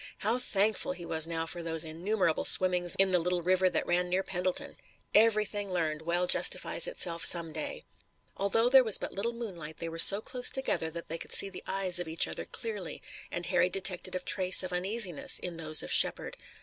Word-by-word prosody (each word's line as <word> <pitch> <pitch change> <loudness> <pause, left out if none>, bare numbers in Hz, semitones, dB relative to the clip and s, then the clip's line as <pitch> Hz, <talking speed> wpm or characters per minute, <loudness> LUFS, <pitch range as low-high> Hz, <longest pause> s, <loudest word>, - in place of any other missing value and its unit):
How 225 +4 -1
thankful 220 +2 0
he 175 - -9
was 160 -1 0
now 165 -1 -3
for 170 +1 -7
those 165 -1 0
innumerable 170 +2 -2
swimmings 180 -1 +5
in 195 0 +3
the 180 - +4
little 175 +1 -2
river 185 +1 +2
that 175 - -2
ran 180 +1 0
near 185 +2 0
Pendleton! 185 -1 -3 0.4
Everything 210 -2 +2
learned 160 -4 -2
well 175 +2 -1
justifies 180 - +3
itself 170 - -2
some 165 -2 +1
day. - - -4 0.5
Although 215 +4 0
there 260 +1 +6
was 220 -4 +1
but - - -7
little 215 +5 -1
moonlight 175 -10 -8
they 165 - -5
were 165 0 -8
so 200 +4 +7
close 250 +3 -2
together 265 -11 -2
that 170 +1 -9
they 165 +1 -5
could - - -6
see 195 - 0
the - - -10
eyes 185 -2 -1
of 175 - -5
each 160 +1 +2
other - - -3
clearly, 210 -6 -7 0.3
and 175 - -5
Harry 180 - +1
detected 185 -1 -1
a - - -2
trace 185 0 +2
of 185 -1 -6
uneasiness 185 -2 0
in 175 -2 -4
those 155 -1 +1
of - - -5
Shepard. - - +2
180 Hz, 200 wpm, -29 LUFS, 170-200 Hz, 0.5 s, so